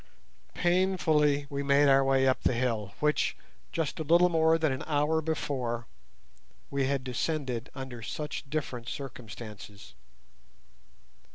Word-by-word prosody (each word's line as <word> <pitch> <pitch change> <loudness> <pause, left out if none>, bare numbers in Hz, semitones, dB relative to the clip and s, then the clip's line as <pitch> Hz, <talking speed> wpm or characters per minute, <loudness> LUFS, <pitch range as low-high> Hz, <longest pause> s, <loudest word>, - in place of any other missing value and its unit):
Painfully 160 -5 +2
we 140 0 -2
made 140 +1 +4
our 135 0 +6
way 135 0 +3
up 130 - +2
the 125 - +1
hill 115 -5 -1
which, 150 0 +1 0.3
just 165 -2 -2
a - - -1
little 170 +3 +5
more 160 -1 +4
than 155 -3 +1
an 130 - -3
hour 150 +1 +2
before, 130 -7 -2 0.9
we 140 -1 +1
had 135 -1 -1
descended 130 -1 -2
under 130 -3 -7
such 150 +4 -5
different 130 -6 -3
circumstances. 110 -6 -9
140 Hz, 125 wpm, -29 LUFS, 125-155 Hz, 0.9 s, our